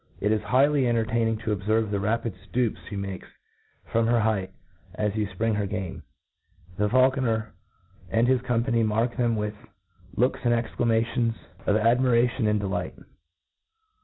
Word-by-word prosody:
k - - -4
is 105 0 +2
high* 130 +5 +4
ly 145 0 +1
entertaining 115 -1 +1
to 110 -1 -2
obfcrve 110 +2 0
the 100 - 0
rapid 110 +2 -1 0.2
ftoops 120 -1 0
flic 100 - -5
makes 95 -1 -5 0.6
from;: 115 0 +1
her 120 0 +3
height 105 -3 0 0.5
as 105 -1 -1
you 105 -2 0
Ipring 110 +4 -1
her 105 -1 -1
game,. 95 -2 -5 0.8
The 105 +1 +1
faulconer 130 -3 +2 0.6
and 115 +5 +2
his 130 -1 +3
company 120 -1 +1
mark 115 +2 0
them 120 -2 +1
with 105 -1 -2 0.6
looks 125 +3 +1
and 120 -1 +3
exclamations 115 0 0 0.3
of 105 - +3
adm'u'ation 120 +1 +3
and 105 0 +2
de 100 - -3
^ - - -1
light - - -3
115 Hz, 160 wpm, -26 LUFS, 105-120 Hz, 0.8 s, high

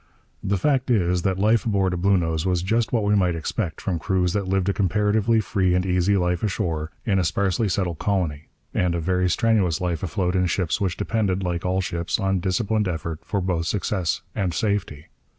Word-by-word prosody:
The 100 0 0
fact 130 +5 +1
is, 90 -6 +2
that 95 +1 0
life 110 +3 +3
aboard 100 -4 +1
a - - -1
Bluenose 85 -4 +1
was 90 -2 0
just 115 +4 0
what 115 -3 +1
we 105 0 +2
might 90 -4 +2
expect 85 +2 -3
from 90 -4 -2
crews 90 0 0
that 100 -2 -1
lived 95 0 0
a 100 - +2
comparatively 105 +4 +2
free 95 -3 +1
and 90 0 +1
easy 90 +2 +2
life 90 -1 0
ashore 80 -6 -2 0.2
in 95 -3 +2
a - - +2
sparsely 95 +6 0
settled 90 -3 -1
colony, 85 -7 -1 0.3
and 90 -1 +1
a - - -1
very 90 +2 +1
strenuous 100 -5 +2
life 85 -3 -2
afloat 90 +1 -1
in 90 -1 +2
ships 90 +2 -1
which 95 -3 -1
depended, 100 -4 0
like 90 0 -2
all 95 +1 +1
ships, 85 0 -2
on 95 -2 +1
disciplined 105 +3 0
effort 80 -2 -4
for 100 -2 -2
both 85 -3 -1
success 95 -1 -1
and 90 -4 -1
safety. 100 -7 -2
95 Hz, 200 wpm, -23 LUFS, 85-100 Hz, 0.3 s, life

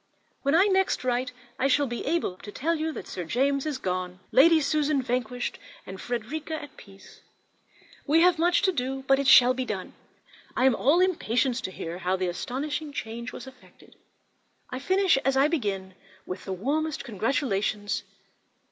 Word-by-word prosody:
When 280 +2 +2
I 370 +4 +6
next 385 -6 +1
write 250 0 0 0.3
I 270 - +3
shall 285 +1 +3
be 240 -2 -4
able 320 - 0
to 205 - -10
tell 315 +10 -1
you 320 0 -2
that - - -8
Sir 180 - -5
James 275 - 0
is 295 -3 -2
gone, 185 -3 -3
Lady 325 +5 +6
Susan 300 0 +1
vanquished, 245 -1 -2 0.3
and 190 0 -8
Frederica 280 +7 -4
at 290 - -11
peace. 195 -1 -16 0.9
We 315 +3 +4
have 355 -1 +4
much 345 +1 +3
to 380 - +4
do, 270 -3 -3
but 270 0 +4
it 275 - -1
shall 250 -1 +8
be 260 0 -2
done. 200 -6 -5 0.6
I 255 - +3
am 265 -3 +5
all 295 +10 +3
impatience 260 -9 +1
to 190 - -5
hear 170 -1 -6
how 185 +1 0
this 180 -2 -2
astonishing 295 +6 -4
change 235 -2 -5
was - - -9
effected. 260 -1 -17 0.8
I 255 - -4
finish 375 +3 +3
as 270 0 +1
I 275 +2 +5
began, 200 - -2 0.3
with 185 - -7
the 195 - -5
warmest 295 - -2
congratulations. 215 -3 -1
260 Hz, 175 wpm, -26 LUFS, 220-300 Hz, 0.9 s, shall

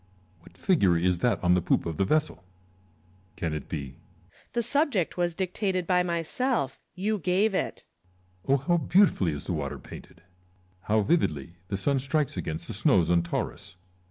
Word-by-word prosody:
What 85 - -18
figure 100 - +3
is 90 +1 +1
that 110 -2 +1
on 90 0 +4
the 90 - +3
poop - - +1
of 80 -2 -4
the 95 - +2
vessel? 155 -3 0 0.9
Can 80 -2 -2
it 75 -2 -5
be - - -2
Lucullus. 70 -2 -14
The 235 - 0
subject 250 - +1
was 175 -2 -1
dictated 185 0 -1
by 180 0 +3
myself; 170 - -1 0.2
you 210 +3 -1
gave 190 +5 +2
it. - - -2 0.6
Coisar. - - -2
Oh 140 - +6
how 160 +6 +1
beautifully 165 - +3
is 70 - -6
the - - -3
water - - -3
painted! 85 - -12 0.7
Hovv 110 -1 +3
vividly 85 - 0
the 100 - -2
sun 135 +7 +1
strikes 140 +2 0
against 80 -3 -4
the - - -5
snows 85 -1 +3
on 85 -1 +4
Taurus 85 +2 -4
140 Hz, 175 wpm, -27 LUFS, -, 0.9 s, Oh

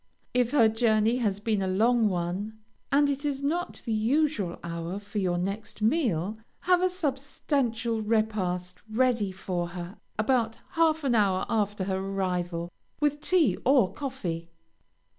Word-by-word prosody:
If 245 -1 +2
her 240 -5 +5
journey 220 +1 +2
has 205 -5 0
been 210 -1 0
a 190 - 0
long 220 +4 +3
one, 185 +4 -3 0.3
and 285 +1 +5
it 280 0 -2
is 280 -2 -2
not 340 +5 -2
the 230 - -1
usual 225 - +1
hour 170 +2 -4
for 205 +1 -5
your 180 -3 +1
next 195 +5 -4
meal, 220 - +1 0.2
have 360 0 +3
a 370 - +3
substantial 270 - -1
repast 195 -5 -1
ready 230 -3 +2
for 185 -2 -3
her 175 +1 -7 0.2
about 225 0 +1
half 320 -1 +2
an 265 -3 +2
hour 200 -4 +2
after 205 -3 0
her 190 0 -1
arrival, 180 -3 -2 0.3
with 295 0 +1
tea 315 - +3
or 245 -9 +4
coffee. 180 - -4
220 Hz, 145 wpm, -28 LUFS, 190-265 Hz, 0.3 s, her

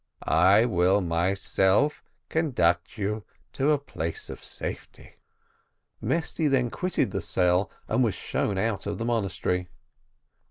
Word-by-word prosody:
I 95 +8 +5
will 95 -3 +3
myself 95 - +1 0.2
conduct 95 - +1
you 105 +1 -2 0.3
to 140 +2 +1
a 150 - +4
place 145 - -5
of - - -10
safety." - - -8 0.8
Mesty 165 -1 0
then 130 -4 +2
quitted 180 0 -1
the 95 - -2
cell 90 +3 +2 0.2
and 130 - +2
was 110 -6 +1
shown 100 - -2
out 100 -1 -1
of - - -3
the 115 - -3
monastery. 95 -5 -1
100 Hz, 125 wpm, -26 LUFS, 90-130 Hz, 0.8 s, I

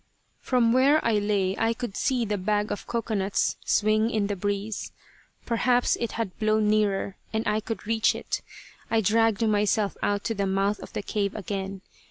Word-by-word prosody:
From 240 -3 +2
where 275 +4 +5
I 225 -2 +3
lay 200 -2 0
I 225 +1 +1
could 240 -5 -5
see 255 -4 +1
the 205 -1 -2
bag 210 +2 0
of 205 - -5
cocoanuts 215 -4 0
swing 215 +1 +2
in 215 -3 0
the 205 0 -2
breeze. 205 +2 -3 0.5
Perhaps 245 +1 +2
it 235 - -3
had 220 -6 -3
blown 215 0 +2
nearer 205 -2 +1
and 220 +1 -1
I 210 - +2
could 220 +1 -6
reach 225 0 +2
it. - - -3 0.5
I 225 -1 +2
dragged 225 +1 +2
myself 210 -1 +1
out 205 0 0
to 225 - -1
the 200 -2 -1
mouth 195 +2 +1
of - - -11
the - - -3
cave 200 -1 -2
again. 195 -2 -4
215 Hz, 180 wpm, -26 LUFS, 200-225 Hz, 0.5 s, where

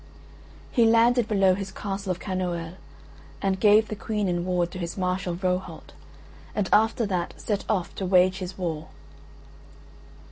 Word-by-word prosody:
He 235 - +4
landed 230 +1 +4
below 195 -3 +3
his 195 0 -4
castle 195 -1 -4
of 180 - -2
Kanoël 175 -3 -3 0.7
and 190 -1 0
gave 210 +2 +5
the 215 - -4
Queen 210 0 -2
in 175 -1 -1
ward 175 -1 0
to 185 - -7
his 170 +1 -5
Marshal 180 -1 -1
Rohalt, 185 +1 -3 0.6
and 205 -3 0
after 220 +2 +3
that 180 -4 -3
set 205 -2 -2
off 190 -6 -1
to 190 - -4
wage 185 +1 +4
his 185 0 -6
war. 160 -4 -3
190 Hz, 150 wpm, -25 LUFS, 180-205 Hz, 0.7 s, gave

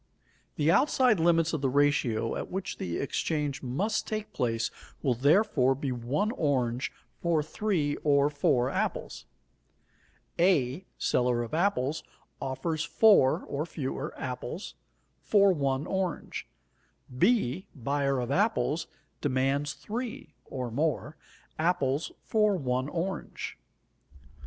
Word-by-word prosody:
The 150 +2 +3
outside 255 - +4
limits 165 0 +3
of 155 - -1
the 135 - +1
ratio 130 -5 +2
at - - -4
which 190 +1 -4
the 85 -2 -3
exchange 145 0 -1
must 185 - -1
take 215 -1 -4
place 115 -3 0 0.3
will, 130 - +3
therefore, 135 - +3
be 135 0 -3
one 130 - -1
orange 130 - 0 0.3
for 165 -3 +2
three 155 -3 -1
or 140 -1 +3
four 130 -4 +2
apples. - - -3 1.1
A, 170 -2 +2
seller 125 -1 +1
of 120 - -8
apples, 160 -5 +1 0.4
offers 155 +4 -2
4 195 -8 +5
(or 140 +2 -2
fewer) 145 -2 -4
apples 125 - -5 0.5
for 200 -2 +4
1 140 -2 0
orange. 190 -3 -3 0.7
B, 185 - +2
buyer 140 +1 0
of 125 +1 -3
apples, 180 -4 +1 0.3
demands 140 +1 +1
3 225 -7 -6
(or 125 -3 -5
more) 150 +2 -1 0.4
apples 155 -3 +1
for 210 -2 +3
1 130 -2 -1
orange. 180 +4 -4
145 Hz, 115 wpm, -29 LUFS, 130-180 Hz, 1.1 s, 4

